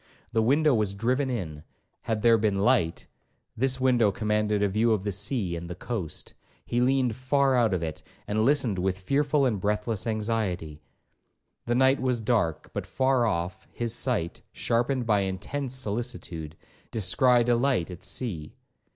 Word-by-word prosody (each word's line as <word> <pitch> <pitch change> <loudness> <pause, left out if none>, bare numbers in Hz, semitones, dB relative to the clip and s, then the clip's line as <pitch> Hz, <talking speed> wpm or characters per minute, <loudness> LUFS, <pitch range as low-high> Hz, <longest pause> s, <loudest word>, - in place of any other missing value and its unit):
The 110 - +2
window 145 +6 +3
was 105 -4 0
driven 125 +6 0
in;—had 95 +2 -6
there 115 -1 +5
been 105 -2 +1
light, 100 -5 +1 0.5
this 130 +2 +1
window 125 -5 +3
commanded 105 0 0
a - - +4
view 110 +4 +2
of 100 -3 -1
the 100 - -1
sea 100 -2 -1
and 85 0 -6
the 90 - -5
coast. 95 -5 -5 0.3
He 120 - 0
leaned 130 -2 +2
far 135 +1 +2
out 120 -3 +3
of 90 -3 -1
it, 80 -1 -5 0.3
and 110 +1 +1
listened 125 -7 +2
with 95 0 0
fearful 140 +8 +1
and 110 -7 0
breathless 105 0 -1
anxiety. 105 -9 -2 0.9
The 120 - +1
night 130 +2 +4
was 125 -2 +1
dark, 110 -8 0
but - - -4
far 130 -2 +2
off, 90 +2 -3
his 120 -1 -2
sight, 115 -9 -1
sharpened 120 +2 0
by 105 -3 +3
intense 105 +8 -3
solicitude, 100 - -3 0.3
descried 120 +4 +3
a 120 - +4
light 120 -8 +1
at 90 - -10
sea. 85 -12 -4
110 Hz, 160 wpm, -27 LUFS, 95-125 Hz, 0.9 s, there